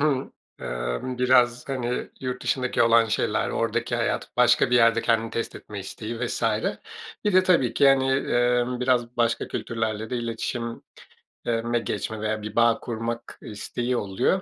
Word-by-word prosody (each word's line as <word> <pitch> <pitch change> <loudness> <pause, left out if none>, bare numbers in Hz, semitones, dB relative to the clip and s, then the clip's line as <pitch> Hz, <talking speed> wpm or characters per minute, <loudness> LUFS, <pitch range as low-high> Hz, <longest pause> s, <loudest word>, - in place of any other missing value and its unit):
ımm, 125 - -3
biraz, 125 0 +3
hani, 125 -2 -2
yurt 125 -1 -4
dışındaki 130 -1 +1
olan 115 0 +5
şeyler, 110 - 0
oradaki - - -1
hayat, - - -1
başka - - +4
bir 125 - +5
yerde 115 -1 +4
kendini 115 -1 +1
test 115 - -3
etme 100 -2 -8
isteği 110 +4 -6
vs. 120 - -4 0.8
Bir 210 - +2
de 185 0 +6
tabii 135 -11 +2
ki 140 - +5
hani, 135 -1 +3
ımm, 125 -1 +1
biraz 125 -2 +1
başka 115 -1 +1
kültürlerle 110 0 -3
de 125 - -1
iletişim 115 0 -4 0.6
eee, 115 -1 0
me 120 0 0
geçme 110 -1 -4
veya 110 0 -1
bir 105 0 -7
bağ 115 -1 +4
kurmak 115 0 -5
isteği 120 +4 -3
oluyor. 110 - 0
120 Hz, 155 wpm, -25 LUFS, 115-125 Hz, 0.8 s, de